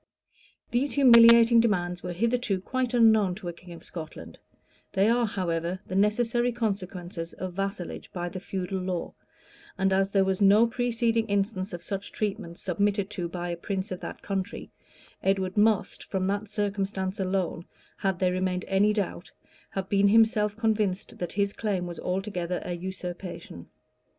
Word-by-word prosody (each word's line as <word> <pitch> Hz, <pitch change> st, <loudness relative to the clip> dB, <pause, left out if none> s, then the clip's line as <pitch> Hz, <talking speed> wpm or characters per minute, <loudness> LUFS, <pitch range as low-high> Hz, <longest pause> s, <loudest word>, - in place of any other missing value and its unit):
These 260 Hz, +4 st, +1 dB
humiliating 235 Hz, -3 st, +8 dB
demands 180 Hz, -6 st, +1 dB
were 180 Hz, -, -4 dB
hitherto 230 Hz, +1 st, 0 dB
quite 255 Hz, +5 st, -2 dB
unknown 220 Hz, -5 st, +5 dB
to 190 Hz, -2 st, -8 dB
a -, -, -5 dB
king 175 Hz, +1 st, -14 dB
of 170 Hz, -1 st, -10 dB
Scotland: 160 Hz, -3 st, -9 dB, 0.5 s
they 195 Hz, +1 st, +3 dB
are, 235 Hz, 0 st, +3 dB
however, 175 Hz, -2 st, -2 dB
the -, -, -8 dB
necessary 230 Hz, +5 st, +2 dB
consequence 195 Hz, -6 st, -3 dB
of 185 Hz, 0 st, -6 dB
vassalage 195 Hz, -1 st, -4 dB
by 175 Hz, -1 st, -3 dB
the 185 Hz, +2 st, -6 dB
feudal 190 Hz, 0 st, -3 dB
law; 180 Hz, -2 st, -3 dB, 0.6 s
and 190 Hz, 0 st, +2 dB
as 195 Hz, 0 st, +2 dB
there 195 Hz, -1 st, +3 dB
was 190 Hz, +1 st, -1 dB
no 205 Hz, +3 st, +6 dB
preceding 230 Hz, -1 st, 0 dB
instance 200 Hz, -1 st, -1 dB
of 175 Hz, -2 st, -7 dB
such 195 Hz, 0 st, -5 dB
treatment 205 Hz, -5 st, -3 dB
submitted 200 Hz, +2 st, 0 dB
to 175 Hz, -4 st, -3 dB
by 175 Hz, 0 st, -4 dB
a 170 Hz, -, -2 dB
prince 190 Hz, +4 st, -4 dB
of 185 Hz, -, -4 dB
that -, -, -8 dB
country, 195 Hz, -1 st, -4 dB, 0.5 s
Edward 190 Hz, -1 st, 0 dB
must, 210 Hz, -1 st, +2 dB
from 190 Hz, -1 st, -2 dB
that 200 Hz, +2 st, -2 dB
circumstance 195 Hz, -2 st, -2 dB
alone, 185 Hz, -3 st, -1 dB, 0.3 s
had 190 Hz, -2 st, 0 dB
there 180 Hz, 0 st, +2 dB
remained 185 Hz, 0 st, -1 dB
any 200 Hz, +2 st, +3 dB
doubt, 200 Hz, -4 st, -3 dB, 0.4 s
have 190 Hz, -1 st, -4 dB
been 200 Hz, 0 st, +3 dB
himself 210 Hz, -1 st, +4 dB
convinced 215 Hz, -4 st, -1 dB
that 175 Hz, -, -4 dB
his 200 Hz, 0 st, 0 dB
claim 200 Hz, -5 st, -2 dB
was 175 Hz, -1 st, -6 dB
altogether 180 Hz, -2 st, -2 dB
a 180 Hz, -, -3 dB
usurpation. 175 Hz, -, -7 dB
195 Hz, 160 wpm, -27 LUFS, 180-215 Hz, 0.6 s, humiliating